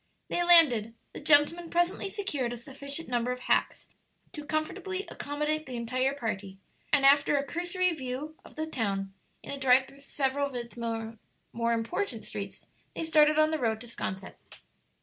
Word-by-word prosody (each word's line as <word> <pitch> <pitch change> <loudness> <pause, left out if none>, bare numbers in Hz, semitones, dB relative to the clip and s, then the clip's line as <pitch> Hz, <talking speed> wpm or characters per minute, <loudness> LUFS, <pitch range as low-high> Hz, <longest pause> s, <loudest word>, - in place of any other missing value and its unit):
'" - - -47
They 350 - +1
landed, 280 -11 +6 0.2
the - - -7
gentlemen 310 +3 +4
presently 350 +3 0
secured 295 - -2
a - - -6
sufficient 280 +5 -4
number 245 0 0
of 250 0 -5
hacks - - +1 0.5
to 300 -5 -7
comfortably 365 +6 -3
accommodate 300 +1 -2
the 255 - -6
entire 255 +3 0
party, 200 -7 -4 0.3
and 285 -2 +4
after 280 +1 +5
a 280 - +1
cursory 350 +3 0
view 280 +2 -5
of - - -15
the 315 - -2
town, 200 -9 -2 0.3
in - - -7
a 280 - -5
drive 260 0 +5
through 275 +1 -17
several 280 0 -1
of 275 - -10
its 235 -1 -6
more 225 -1 -4 0.3
important 230 - -1
streets, - - -7 0.3
they - - -3
started 305 -1 +4
on 310 0 +4
the 315 - -1
road 225 -3 0
to 240 - -10
'Sconset. 190 -4 -5
280 Hz, 170 wpm, -29 LUFS, 235-315 Hz, 0.5 s, landed